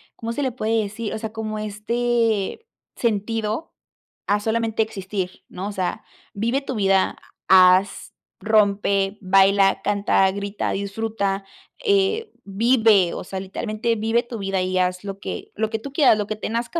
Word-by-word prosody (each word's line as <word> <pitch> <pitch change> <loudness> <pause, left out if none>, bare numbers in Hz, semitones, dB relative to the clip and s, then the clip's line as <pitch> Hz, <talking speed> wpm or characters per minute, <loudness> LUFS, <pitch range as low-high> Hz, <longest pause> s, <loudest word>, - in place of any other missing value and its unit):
¿cómo 230 0 -5
se 290 - -2
le 260 - 0
puede 225 -2 0
decir?, 215 +1 -5
o - - -3
sea, 220 0 -5
como 215 -1 -4
este 225 - -1 0.3
sentido, 225 +4 -2 0.5
a 205 +1 +2
solamente 225 +1 0
existir, 195 -3 -5
¿no? 190 +2 -5
O - - -4
sea, 185 -3 -3 0.3
vive 235 +7 0
tu 270 -2 -5
vida, 195 -2 +2 0.3
ha 185 -1 +8
haz, 195 +2 -6 0.3
rompe, 200 -2 +2
baila, 195 0 +4
canta, 200 -1 +2
grita, 200 +1 -3
disfruta, 200 0 -2 0.4
eh, 410 +2 +2
vive, 215 -2 +3
o - - -5
sea, 190 +1 -5
literalmente 215 +4 -2
vive 225 +2 +1
tu 235 -2 -7
vida 195 -1 -1
y 185 0 0
haz 180 0 0
lo 195 -1 -6
que - - -6
lo 220 +1 -1
que 220 - -2
tú 275 +5 -9
quieras, 275 -7 +5
lo 210 -1 -2
que 215 - -4
nazca 235 +9 -2
210 Hz, 160 wpm, -22 LUFS, 195-230 Hz, 0.5 s, ha